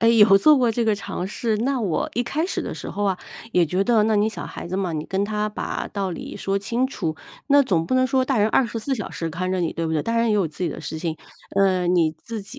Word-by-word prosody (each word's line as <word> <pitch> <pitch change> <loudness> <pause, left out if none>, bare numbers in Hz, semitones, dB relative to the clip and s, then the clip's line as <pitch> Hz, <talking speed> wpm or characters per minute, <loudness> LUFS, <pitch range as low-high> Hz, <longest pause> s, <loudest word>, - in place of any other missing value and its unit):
哎， 230 - +4
有 210 -3 +7
做 300 +8 +6
过 245 -2 +3
这 235 +1 0
个 220 -1 +3
尝 195 -2 -5
试。 220 +2 -1
那 260 +3 0
我 185 -8 -1
一 240 - +1
开 290 +7 -1
始 370 - -2
的 - - -4
时 - - -7
候 205 - -2
啊， 195 -2 +1 0.4
也 180 - +4
觉 180 +4 0
得 230 -2 +4
那 215 0 +2
你 205 +1 +3
小 220 - -6
孩 - - -7
子 185 +2 -3
嘛， 185 -3 -1
你 155 -1 -3
跟 195 +1 0
他 210 0 -1
把 210 - -4
道 195 -2 -3
理 170 - -7
说 195 0 -1
清 230 +6 0
楚， 165 - -3 0.3
那 285 0 +6
总 170 -9 0
不 255 - 0
能 255 0 +4
说 260 0 +2
大 265 0 0
人 210 - +4
24 230 +2 0
小 210 -6 -5
时 165 -1 -4
看 185 +3 -3
着 185 -1 0
你， 170 - -1
对 165 - -2
不 160 - -2
对？ 155 -2 +1
大 230 0 -1
人 230 0 +2
也 215 - +3
有 200 -4 +2
自 155 +4 -8
己 - - 0
的 155 - -6
事 160 +1 -5
情， 160 0 -3 0.4
呃， 190 -2 +3
你 175 -3 +3
自 225 -3 -6
己 225 +7 -10
205 Hz, 300 characters per minute, -23 LUFS, 180-230 Hz, 0.4 s, 有